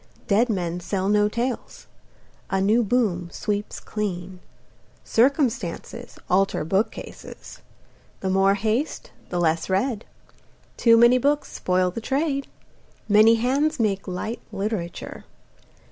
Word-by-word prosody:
Dead 225 Hz, +4 st, +2 dB
men 175 Hz, -4 st, -2 dB
sell 190 Hz, +2 st, -2 dB
no 210 Hz, 0 st, +3 dB
tales. 240 Hz, +3 st, -4 dB, 0.6 s
A 195 Hz, -, 0 dB
new 210 Hz, +5 st, +3 dB
boom 200 Hz, -7 st, 0 dB
sweeps 205 Hz, +2 st, -3 dB
clean. 185 Hz, -3 st, -5 dB, 0.6 s
Circumstances 245 Hz, -, 0 dB
alter 195 Hz, -4 st, +1 dB
bookcases. 195 Hz, +6 st, -4 dB, 0.6 s
The 190 Hz, -, -1 dB
more 195 Hz, +1 st, +4 dB
haste 220 Hz, +8 st, -2 dB, 0.2 s
the 175 Hz, -, -2 dB
less 165 Hz, 0 st, +1 dB
read. 210 Hz, +4 st, 0 dB, 0.7 s
Too 230 Hz, -1 st, +5 dB
many 240 Hz, +2 st, +6 dB
books 290 Hz, +3 st, 0 dB
spoil 180 Hz, 0 st, +1 dB
the 230 Hz, -, -6 dB
trade. 275 Hz, +2 st, -1 dB, 0.6 s
Many 215 Hz, +2 st, +6 dB
hands 275 Hz, +6 st, +1 dB
make 200 Hz, -4 st, 0 dB
light 190 Hz, +5 st, -4 dB
literature. 195 Hz, -4 st, -4 dB
210 Hz, 115 wpm, -24 LUFS, 190-240 Hz, 0.7 s, many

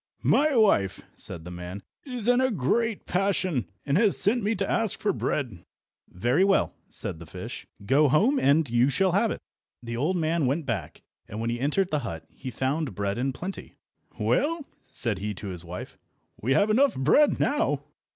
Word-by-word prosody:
"My 295 Hz, 0 st, +3 dB
wife," 195 Hz, -, +3 dB
said 80 Hz, -, -8 dB
the 90 Hz, -, -7 dB
man, 90 Hz, +3 st, -7 dB, 0.2 s
"is 250 Hz, -5 st, -2 dB
in 245 Hz, +1 st, +5 dB
a 260 Hz, -, +3 dB
great 225 Hz, -, 0 dB
passion, 185 Hz, -, 0 dB, 0.2 s
and 145 Hz, +5 st, +2 dB
has 210 Hz, -3 st, +3 dB
sent 230 Hz, +5 st, +2 dB
me 215 Hz, +2 st, 0 dB
to 195 Hz, 0 st, -1 dB
ask 225 Hz, -3 st, 0 dB
for 205 Hz, -2 st, +1 dB
bread." 120 Hz, -, -2 dB, 0.5 s
"Very 120 Hz, -, +1 dB
well," 195 Hz, 0 st, +3 dB, 0.2 s
said 80 Hz, -, -5 dB
the 85 Hz, -, -10 dB
fish, -, -, -8 dB, 0.2 s
"go 140 Hz, +6 st, +4 dB
home 220 Hz, -, +3 dB
and 150 Hz, -, +3 dB
you 120 Hz, +2 st, +3 dB
shall 185 Hz, +7 st, +2 dB
have 200 Hz, +5 st, +2 dB
it." -, -, -5 dB, 0.4 s
The 115 Hz, 0 st, -4 dB
old 160 Hz, +9 st, +1 dB
man 160 Hz, -3 st, +1 dB
went 145 Hz, +4 st, 0 dB
back, 115 Hz, -8 st, -4 dB, 0.2 s
and 105 Hz, -, -6 dB
when 115 Hz, +1 st, -1 dB
he 120 Hz, -, -3 dB
entered 155 Hz, +8 st, +1 dB
the 150 Hz, -, +1 dB
hut 85 Hz, -, -6 dB
he 130 Hz, -, -7 dB
found 130 Hz, -, -2 dB
bread 100 Hz, +3 st, -2 dB
in 135 Hz, +2 st, 0 dB
plenty. 185 Hz, +9 st, -7 dB, 0.4 s
"Well," 315 Hz, 0 st, +1 dB, 0.2 s
said 115 Hz, -7 st, -2 dB
he 105 Hz, +1 st, -3 dB
to 100 Hz, +2 st, -6 dB
his 90 Hz, -3 st, -6 dB
wife, -, -, -8 dB, 0.4 s
"we 130 Hz, +5 st, +2 dB
have 205 Hz, +1 st, +3 dB
enough 265 Hz, +4 st, +4 dB
bread 155 Hz, -, +4 dB
now." -, -, +1 dB
150 Hz, 190 wpm, -26 LUFS, -, 0.5 s, in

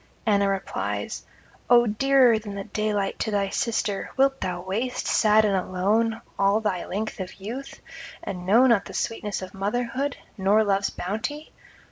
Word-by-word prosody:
Anna 200 Hz, -2 st, +3 dB
replies: 195 Hz, -1 st, -3 dB, 0.4 s
'O 240 Hz, -1 st, +7 dB
dearer 245 Hz, +1 st, +4 dB
than 205 Hz, -2 st, -8 dB
the 200 Hz, -, -4 dB
daylight 210 Hz, -1 st, -2 dB
to -, -, -1 dB
thy 200 Hz, -2 st, 0 dB
sister, 210 Hz, -2 st, -1 dB
wilt 270 Hz, 0 st, +3 dB
thou 180 Hz, -1 st, -2 dB
waste, 225 Hz, +7 st, -2 dB
sad 215 Hz, 0 st, +4 dB
and 200 Hz, -2 st, +2 dB
alone, 205 Hz, +5 st, 0 dB, 0.2 s
all 200 Hz, +2 st, +4 dB
thy 205 Hz, -5 st, -2 dB
length 215 Hz, +2 st, -4 dB
of 185 Hz, -1 st, -6 dB
youth, 240 Hz, +8 st, -7 dB, 0.4 s
and 185 Hz, -3 st, -5 dB
know 230 Hz, +6 st, +6 dB
not 230 Hz, -6 st, +4 dB
the -, -, -9 dB
sweetness 210 Hz, -4 st, -3 dB
of 185 Hz, -, -9 dB
motherhood, 245 Hz, +7 st, -2 dB, 0.2 s
nor 200 Hz, +3 st, +4 dB
love's 200 Hz, -1 st, +1 dB
bounty? 225 Hz, -, -4 dB
210 Hz, 155 wpm, -25 LUFS, 195-235 Hz, 0.4 s, O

